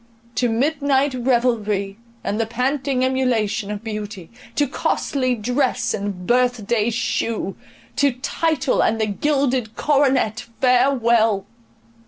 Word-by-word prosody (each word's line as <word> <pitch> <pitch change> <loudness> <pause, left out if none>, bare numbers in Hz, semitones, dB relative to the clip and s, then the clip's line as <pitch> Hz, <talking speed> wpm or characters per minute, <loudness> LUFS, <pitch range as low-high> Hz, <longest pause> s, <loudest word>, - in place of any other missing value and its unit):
—To 245 0 +1
midnight 280 +2 +1
revelry, 230 -5 0 0.2
and 205 +2 -2
the 225 - -1
panting 260 +2 0
emulation 225 -6 0
of 210 +1 -5
beauty, 210 -5 -6 0.2
to 290 - +3
costly 255 -1 -1
dress 245 +4 0
and 195 -3 -4
birth 245 -1 +2
day 220 0 +1
shew, 230 -3 -2 0.4
to 280 -2 +3
title 290 +2 0
and 225 0 +1
the 220 - +2
gilded 255 0 0
coronet, 265 -6 +1
farewell! 235 -5 +3
245 Hz, 115 wpm, -21 LUFS, 215-265 Hz, 0.4 s, to